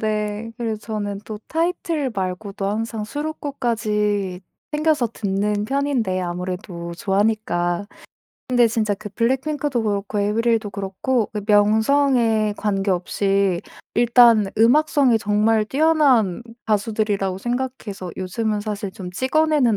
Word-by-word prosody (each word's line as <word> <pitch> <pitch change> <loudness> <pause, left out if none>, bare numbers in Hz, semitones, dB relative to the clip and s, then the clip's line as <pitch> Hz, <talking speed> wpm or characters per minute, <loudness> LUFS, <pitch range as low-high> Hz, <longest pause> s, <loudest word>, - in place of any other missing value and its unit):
네. 215 +1 -2
그래서 225 -3 -3
저는 205 -2 -4
또 215 -1 -6
타이틀 330 -4 -1
말고도 195 0 -4
항상 220 0 -3
수록곡까지 215 -9 -2 0.3
챙겨서 300 -5 +2
듣는 205 0 -1
편인데 255 -8 0
아무래도 180 -1 -5
좋아하니까. 200 -3 0 0.6
근데 245 -2 +4
진짜 215 -2 0
그 210 +1 -9
블랙핑크도 265 +3 0
그렇고 205 0 -1
에이브릴도 220 +1 +1
그렇고 200 +5 -1
그 210 -1 -3
명성에 220 +1 +3
관계없이 195 -1 0 0.3
일단 235 -3 +6
음악성이 260 0 +4
정말 215 +1 +2
뛰어난 270 - +3 0.2
가수들이라고 205 -3 0
생각해서 240 -6 -4
요즘은 210 +3 -2
사실 205 -2 -4
좀 185 -1 -8
찍어내는 265 -1 +2
215 Hz, 295 characters per minute, -21 LUFS, 200-245 Hz, 0.6 s, 일단